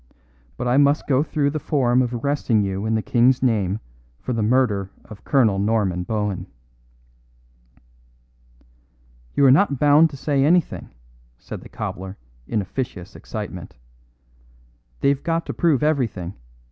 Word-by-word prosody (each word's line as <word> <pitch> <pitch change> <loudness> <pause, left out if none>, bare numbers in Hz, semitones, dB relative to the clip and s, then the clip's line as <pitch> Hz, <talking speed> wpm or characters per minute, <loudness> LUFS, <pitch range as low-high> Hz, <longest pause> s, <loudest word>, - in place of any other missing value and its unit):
But - - -3
I 125 +2 +2
must 145 +1 +3
go 135 -1 +2
through 145 -2 0
the 155 - -3
form 130 -4 +2
of 125 -2 -1
arresting 120 -3 0
you 100 +2 -3
in 110 - +1
the 110 - -1
King's 125 +2 +3
name 105 -5 +1 0.4
for 125 - -4
the 115 - -1
murder 105 -4 +1 0.2
of 110 -2 -13
Colonel 115 -9 +2
Norman 100 -4 0
Bohun." 105 0 -3 2.9
"You 140 - +4
are 130 - +7
not 145 0 +3
bound 150 +4 +5
to 140 - -10
say 140 0 +1
anything," 170 +4 +1 0.5
said - - -9
the - - -13
cobbler 95 +1 -6 0.3
in 105 -3 -1
officious 100 -2 -6
excitement. 105 -5 -7 1.3
"They've 140 0 +2
got 165 0 -1
to - - -4
prove 155 -5 +2
everything. 115 - -1
120 Hz, 140 wpm, -22 LUFS, 105-140 Hz, 2.9 s, are